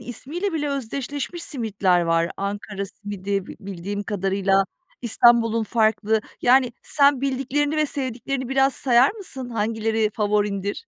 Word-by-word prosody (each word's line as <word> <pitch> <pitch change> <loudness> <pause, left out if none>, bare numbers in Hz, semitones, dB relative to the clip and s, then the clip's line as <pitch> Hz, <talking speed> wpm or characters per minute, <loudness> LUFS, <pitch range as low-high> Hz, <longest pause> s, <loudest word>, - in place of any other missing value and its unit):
ismiyle 300 - -4
bile 295 -2 -1
özdeşleşmiş 280 +5 -4
simitler 205 - +1
var. 165 0 +1
Ankara 200 0 -4
simidi 200 -1 -4
bi - - -9
bildiğim 200 +1 -5
kadarıyla, 195 -1 +1 0.4
İstanbul'un 230 -1 +4
farklı. 220 0 +1 0.2
Yani, 250 0 +4
sen 280 -2 +3
bildiklerini 275 +2 0
ve 305 - +2
sevdiklerini 260 -1 -3
biraz 270 0 +2
sayar 250 0 +4
mısın? 285 - -7
Hangileri 220 -1 0
favorindir? 205 -1 0
225 Hz, 120 wpm, -23 LUFS, 200-270 Hz, 0.4 s, İstanbul'un